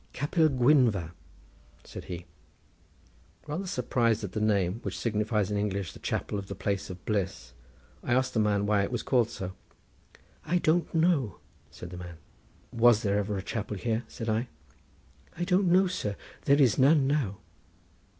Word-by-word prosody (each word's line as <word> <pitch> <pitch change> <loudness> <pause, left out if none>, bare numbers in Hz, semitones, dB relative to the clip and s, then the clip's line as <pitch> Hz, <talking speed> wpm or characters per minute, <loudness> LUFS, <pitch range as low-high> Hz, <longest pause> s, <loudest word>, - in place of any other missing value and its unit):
"Capel 155 +3 +2
Gwynfa," 125 - +3 0.7
said - - -9
he. 90 -1 -7 1.2
Rather 160 +6 -4
surprised 115 -6 0
at 100 - -4
the 110 - -3
name, 100 -2 +1
which - - -4
signifies 105 -2 0
in 105 - 0
English 100 -3 -2
the - - -12
Chapel 105 - -2
of 100 - -8
the 100 - -6
place 100 +1 -2
of 90 -1 -9
bliss, 95 - -2 0.5
I 120 - +1
asked 130 0 +1
the 115 - +1
man 105 -1 +2
why 105 -1 +2
it 100 - -2
was 120 - -2
called 120 -4 +2
so. 95 -6 -5 0.9
"I 175 +4 +1
don't 170 0 +1
know," 160 - +2 0.3
said 85 +5 -10
the 90 - -7
man. 85 -2 -9 0.5
"Was 115 -1 +4
there 100 -1 +1
ever 105 0 -2
a 95 - -4
chapel 105 -1 -4
here?" 115 +3 -1
said 115 - -7
I. 110 +3 0 0.9
"I 175 - -1
don't 180 0 +2
know, 185 +2 +5
sir; 105 - -3 0.3
there 140 +1 +4
is 130 -5 +4
none 140 +1 +5
now." 135 -9 0
110 Hz, 170 wpm, -28 LUFS, 100-135 Hz, 1.2 s, know